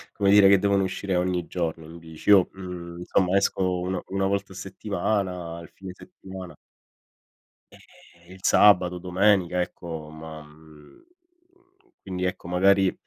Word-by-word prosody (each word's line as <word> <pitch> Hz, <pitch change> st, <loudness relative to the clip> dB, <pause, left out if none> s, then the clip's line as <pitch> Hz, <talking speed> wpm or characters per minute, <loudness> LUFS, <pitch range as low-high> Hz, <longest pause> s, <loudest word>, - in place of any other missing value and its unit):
come 100 Hz, -1 st, +2 dB
dire 100 Hz, -1 st, +7 dB
che 100 Hz, -, +7 dB
devono 100 Hz, 0 st, +1 dB
uscire 95 Hz, 0 st, -2 dB
ogni 90 Hz, -1 st, 0 dB
giorno 80 Hz, -2 st, -4 dB
tu 85 Hz, +2 st, -11 dB
dici. 80 Hz, +2 st, -8 dB
Io, 95 Hz, -3 st, +6 dB
mhmm, 90 Hz, -2 st, -8 dB
insomma 90 Hz, +2 st, +1 dB
esco 90 Hz, -2 st, 0 dB
un 90 Hz, 0 st, -3 dB
1 95 Hz, 0 st, -1 dB
volta 100 Hz, 0 st, -2 dB
a -, -, -15 dB
settimana, 95 Hz, -3 st, -3 dB
il 85 Hz, -, -12 dB
fine 95 Hz, -1 st, -9 dB
settimana. 95 Hz, -, -11 dB, 1.2 s
Eh, 85 Hz, +1 st, -20 dB
il 95 Hz, -, -14 dB
sabato, 90 Hz, -3 st, +4 dB
domenica 90 Hz, 0 st, +2 dB
ecco, 80 Hz, -3 st, -6 dB
ma 80 Hz, 0 st, -10 dB
mhmm, 75 Hz, -, -18 dB, 1.0 s
quindi 90 Hz, -1 st, -4 dB
ecco, 90 Hz, -1 st, -4 dB
magari 95 Hz, +1 st, +3 dB
90 Hz, 140 wpm, -25 LUFS, 85-95 Hz, 1.2 s, dire